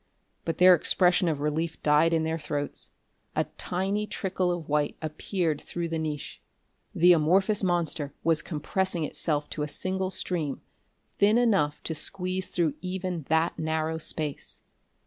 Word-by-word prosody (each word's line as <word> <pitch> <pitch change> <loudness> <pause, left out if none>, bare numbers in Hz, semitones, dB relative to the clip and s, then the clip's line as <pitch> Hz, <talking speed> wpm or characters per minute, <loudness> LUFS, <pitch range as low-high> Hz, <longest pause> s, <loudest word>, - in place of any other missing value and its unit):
But 165 - -2
their 185 0 +8
expression 180 +1 +3
of 150 -3 -1
relief 155 +2 -1
died 150 +2 +4
in 165 -1 +2
their 160 +1 -1
throats. 145 -1 -3 0.5
A - - +2 0.2
tiny 195 +4 -1
trickle 185 -3 -1
of 175 -3 -4
white 150 0 0
appeared 160 0 -2
through 170 -1 -4
the 165 0 -2
niche. 150 -3 -5 0.5
The 175 +2 +7
amorphous 190 +6 +3
monster 170 -5 0
was 160 -1 +3
compressing 175 +2 -1
itself 150 -1 -1
to 150 - -3
a 150 - -1
single 185 +4 -2
stream, 165 -7 -2 0.6
thin 210 +3 +5
enough 195 -12 +2
to 160 - -2
squeeze 185 +3 -2
through 165 -5 +1
even 185 -4 -4
that 160 +2 +1
narrow 160 0 -1
space. 155 -2 -2
165 Hz, 145 wpm, -27 LUFS, 155-185 Hz, 0.6 s, their